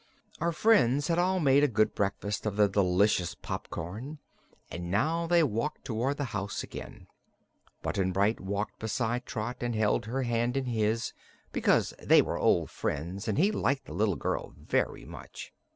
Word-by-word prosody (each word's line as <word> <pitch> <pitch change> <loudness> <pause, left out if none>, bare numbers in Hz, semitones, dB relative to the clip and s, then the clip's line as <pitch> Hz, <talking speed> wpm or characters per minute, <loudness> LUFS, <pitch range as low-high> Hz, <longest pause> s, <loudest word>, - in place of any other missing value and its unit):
Our 170 +2 +1
friends 145 - +3
had 170 0 +2
all 185 +1 +2
made 140 -2 +4
a - - +6
good 110 -4 +2
breakfast 100 +1 -2
of 105 - -2
the 105 0 +5
delicious 95 -2 +2
popcorn 110 - -6 0.5
and 85 +1 -5
now 155 - +1
they 170 -1 +4
walked 140 +3 -2
toward 130 +3 -1
the 145 - -1
house 100 0 -3
again. - - -9 0.8
Button 95 -1 0
Bright 100 +4 +2
walked 100 +2 -3
beside 115 +2 -2
Trot 120 -1 -4
and 120 -1 -1
held 110 +1 +1
her 130 +3 -1
hand 120 +1 0
in 135 - -1
his, 115 -1 0 0.4
because - - +2
they - - +6
were - - -3
old - - +2
friends 90 +9 -3
and 110 - 0
he 195 +6 +4
liked 140 -9 0
the - - -9
little 100 +1 +1
girl - - -3
very - - -1
much. - - -10
115 Hz, 170 wpm, -29 LUFS, 100-140 Hz, 0.8 s, a